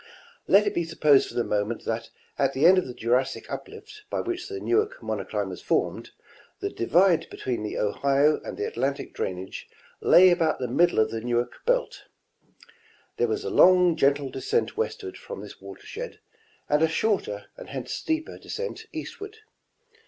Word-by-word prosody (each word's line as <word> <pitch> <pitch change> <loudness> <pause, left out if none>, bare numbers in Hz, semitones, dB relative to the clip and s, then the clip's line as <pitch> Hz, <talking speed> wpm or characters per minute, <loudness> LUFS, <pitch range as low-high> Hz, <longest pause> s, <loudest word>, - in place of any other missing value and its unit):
Let 205 +2 +6
it 205 - 0
be 170 - 0
supposed 150 -4 +3
for - - -11
the 120 - +1
moment 105 +2 -2
that 115 0 -3 0.3
at 135 -1 +2
the 140 +4 +2
end 185 +2 +8
of 185 - -4
the 125 - -6
Jurassic 125 +3 0
uplift 425 0 -9
by - - -2
which 360 +2 -4
the 400 -1 -5
Newark 430 +7 0
monocline - - -3
was - - -8
formed, - - -1 0.5
the 400 0 -3
divide 180 - +3
between 125 -3 -3
the 105 - -4
Ohio 140 +8 +2
and - - -7
the 415 - -2
Atlantic 140 - -2
drainage 95 +1 -5 0.3
lay 185 +1 +7
about 165 -3 +2
the 125 - -3
middle 175 +9 +3
of 110 - +3
the 115 - -3
Newark 120 +1 -2
belt. - - 0 1.1
There - - +2
was 420 -1 -2
a 435 - -3
long 180 - +6
gentle 140 -2 +2
descent 450 +3 -1
westward 435 -4 -3
from 485 0 -8
this - - -12
watershed 480 +4 -8 0.5
and 150 +1 +2
a 160 - +5
shoi'ter 160 - -1
and - - -11
hence - - -5
steeper 320 0 -3
descent 475 +1 -6
east - - -7
ward. 415 +1 -8
170 Hz, 175 wpm, -26 LUFS, -, 1.1 s, end